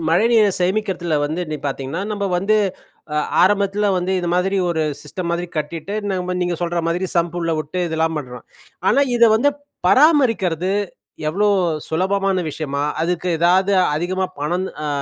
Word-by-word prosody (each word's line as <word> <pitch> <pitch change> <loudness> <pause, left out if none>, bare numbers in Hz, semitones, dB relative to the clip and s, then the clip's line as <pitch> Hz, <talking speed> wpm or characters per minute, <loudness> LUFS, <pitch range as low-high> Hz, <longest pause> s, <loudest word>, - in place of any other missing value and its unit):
மழைநீரை 215 +5 +4
சேமிக்கிறதில 185 -3 0
வந்து 155 +4 -2
நீங் 150 -2 -5
பார்த்திங்கன்னா, 135 +5 -3
நம்ம 200 -1 -2
வந்து 210 +4 +2 0.6
அ 150 - +1 0.2
ஆரம்பத்தில 200 +1 +2
வந்து, 180 +2 -1
இது 175 - -2
மாதிரி 190 +2 +1
ஒரு 160 -2 0 0.2
சிஸ்டம் 170 +3 -4
மாதிரி 175 +1 -2
கட்டிட்டு, 160 +5 -4 0.2
நம்ம 180 -1 -2
நீங்க 175 -1 -1
சொல்ற 170 0 -1
மாதிரி, 180 +3 -1
சம்பு 170 0 0
உள்ள 165 -1 0
விட்டு 155 +4 -4
இதெல்லாம் 160 0 0
பண்ணுறோம். 125 -3 -8 0.5
ஆனா, 280 - +4
இதை 235 -1 +6
வந்து 285 +6 +3 0.4
பராமரிக்கிறது, 225 - +3 0.6
எவ்வளோ 205 +6 +1 0.4
சுலபமான 190 +3 0
விஷயமா? 140 -2 -3 0.2
அதுக்கு 175 +1 -1
எதாவது 185 +4 +3 0.2
அதிகமா 185 +3 -1
பணம் 175 +6 -1 0.2
அ - - -1
180 Hz, 150 wpm, -20 LUFS, 165-195 Hz, 0.6 s, இதை